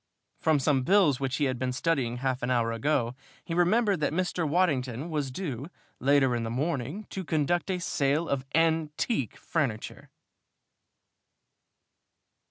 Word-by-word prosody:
From 155 -2 +3
some 140 -1 +2
bills 155 -3 +4
which 135 -1 -1
he 145 - 0
had 130 -3 0
been 130 0 -1
studying 130 -4 0
half 130 0 -1
an 125 - -2
hour 120 -2 +2
ago 120 0 0 0.3
he 165 - -4
remembered 195 +3 +3
that 150 - 0
Mr. 175 -1 -1
Waddington 145 -4 0
was 145 -3 -1
due, 135 -3 -4 0.3
later 135 -1 +3
in 120 - -1
the 115 - -3
morning, 145 - -2
to 190 - -4
conduct 165 +3 0
a 185 - 0
sale 150 -2 0
of 135 -2 -1
"antique" 160 - +1
furniture! 135 -10 -3
145 Hz, 145 wpm, -28 LUFS, 130-165 Hz, 0.3 s, bills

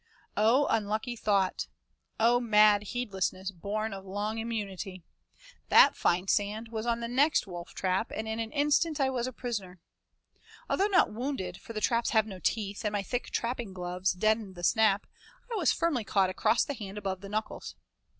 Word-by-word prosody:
Oh, 235 +7 +4
unlucky 220 +3 -1
thought! 200 -4 0 0.5
Oh, 235 +2 +4
mad 210 -3 +5
heedlessness 195 -4 -3
born 205 +4 -3
of 195 -1 -7
long 205 +3 -3
immunity! 200 -5 -4 0.7
That - - +7
fine 180 +2 +1
sand 210 +3 0
was 225 0 -4
on 235 0 0
the 235 - -2
next 275 +6 +3
wolftrap 185 +3 -2
and 220 - -4
in 220 +1 -3
an 225 -1 -3
instant 295 +2 +2
I 265 -1 +2
was 250 -1 -1
a - - -4
prisoner. 210 -8 -5 0.9
Although 395 - +2
not 380 - +3
wounded, 220 -7 -3
for 230 - -10
the 215 - -3
traps 235 +1 +1
have 220 -2 +3
no 195 -4 -8
teeth, 205 0 -2
and 210 -1 -1
my 205 -1 -1
thick 245 +5 -3
trapping 235 -4 -3
gloves 180 0 -1
deadened 215 0 0
the 175 - -9
snap, 215 +1 +3 0.5
I - - -1
was 360 -7 +3
firmly 325 -8 0
caught 195 -2 +2
across 220 +4 +2
the 285 - -3
hand 210 -5 -7
above 190 -2 -3
the 200 - -8
knuckles. 215 +1 -4
215 Hz, 175 wpm, -29 LUFS, 195-235 Hz, 0.9 s, That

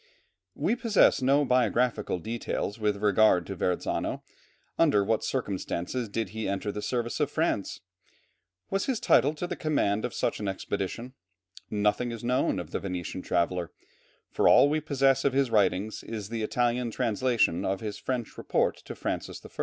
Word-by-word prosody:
We 235 - +1
possess 225 - +3
no 140 +3 +3
biographical 125 -4 +1
details 110 +2 -3
with 105 -1 -1
regard 105 -3 +4
to 95 - -5
Verrazzano. 90 -1 -2 0.6
Under 145 -12 +4
what 110 +2 0
circumstances 105 -1 -3
did 110 -1 -2
he 110 0 -4
enter 100 +1 -2
the 105 - -5
service 120 +3 -2
of 145 -2 +1
France? 155 - -1 0.9
What 195 - +1
was 195 - -2
his 260 -5 0
title 145 +3 +3
to 165 - -3
the 175 - -4
command 110 -9 0
of 125 - -3
such - - -1
an 105 - -3
expedition? 100 +5 -4 0.6
Nothing 105 +3 0
is 115 -1 -7
known 125 +3 +1
of 85 -2 -6
the - - -2
Venetian 90 -1 -4
traveller, 85 -1 0 0.6
for - - +3
all - - +7
we 155 +1 0
possess 135 -2 +2
of 140 - +2
his 135 -3 +1
writings 100 0 +1
is 105 -3 -6
the 115 -1 -3
Italian 120 +2 0
translation 110 -5 +1
of 95 0 -1
his 105 -2 -5 0.4
report - - +1
to - - -9
Francis - - -4
I. - - -9
115 Hz, 165 wpm, -28 LUFS, 100-130 Hz, 0.9 s, all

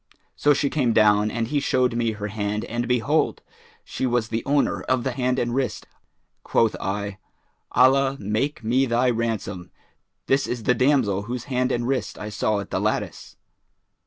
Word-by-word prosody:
So 145 0 +3
she 140 0 0
came 125 -6 +1
down 105 -1 +4
and 115 +1 -2
he 145 0 +1
showed 130 -3 +1
me 115 -1 0
her 105 -1 -6
hand 105 +1 -2
and 120 +1 -3
behold, 125 +5 +1 0.4
she 130 - -3
was 120 -2 0
the 115 0 -2
owner 140 0 +1
of 130 -2 +1
the 130 - -1
hand 125 0 0
and 120 -2 -1
wrist. 130 -4 -2 0.6
Quoth 115 -2 +2
I, 100 +1 -3 0.5
'Allah 135 +2 +4
make 110 +7 -2
me 130 +4 +2
thy 120 +1 +2
ransom! 110 -6 -3 0.6
this 135 +1 +1
is 120 -2 -4
the 125 - +3
damsel 125 -6 +2
whose 125 -1 -3
hand 125 +1 +1
and 120 -1 -1
wrist 135 0 -2
I 105 - -6
saw 105 0 0
at 100 - -10
the - - 0
lattice.' - - -3
120 Hz, 175 wpm, -24 LUFS, 110-130 Hz, 0.6 s, down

